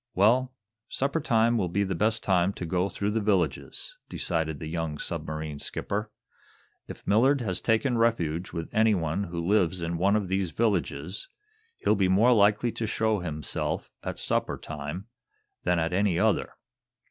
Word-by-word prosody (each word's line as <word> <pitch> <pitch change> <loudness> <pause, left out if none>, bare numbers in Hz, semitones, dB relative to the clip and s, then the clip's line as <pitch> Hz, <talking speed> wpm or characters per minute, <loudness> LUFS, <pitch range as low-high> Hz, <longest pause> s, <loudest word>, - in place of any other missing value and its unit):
"Well, 125 +6 +3 0.3
supper 140 +4 0
time 115 -4 +3
will 90 -3 0
be 100 +4 +1
the 95 -1 -1
best 110 +5 +1
time 95 0 +2
to 90 - -5
go 90 +3 0
through 100 +1 -2
the 110 - +1
villages," 95 -9 -1
decided 80 -3 -1
the 80 - -7
young 80 -1 -3
submarine 75 -1 -4
skipper 105 +7 -3 0.8
"If - - -10
Millard 130 +7 +4
has 95 -6 -2
taken 120 +2 +2
refuge 90 -8 +1
with 85 -1 -4
anyone 100 -5 +2
who 85 -1 -4
lives 95 -2 +2
in 85 0 -2
one 100 +3 +3
of 105 -3 0
these 95 -1 0
villages, 95 -4 -1 0.5
he'll - - +4
be 100 -3 +2
more 110 +7 +5
likely 105 +2 +3
to 110 - -3
show 110 -1 +1
himself 80 -4 -3
at - - -5
supper - - 0
time 75 +5 -6 0.6
than 90 0 +3
at 85 +1 0
any 95 -2 +2
other." - - +1
95 Hz, 160 wpm, -27 LUFS, 85-110 Hz, 0.8 s, more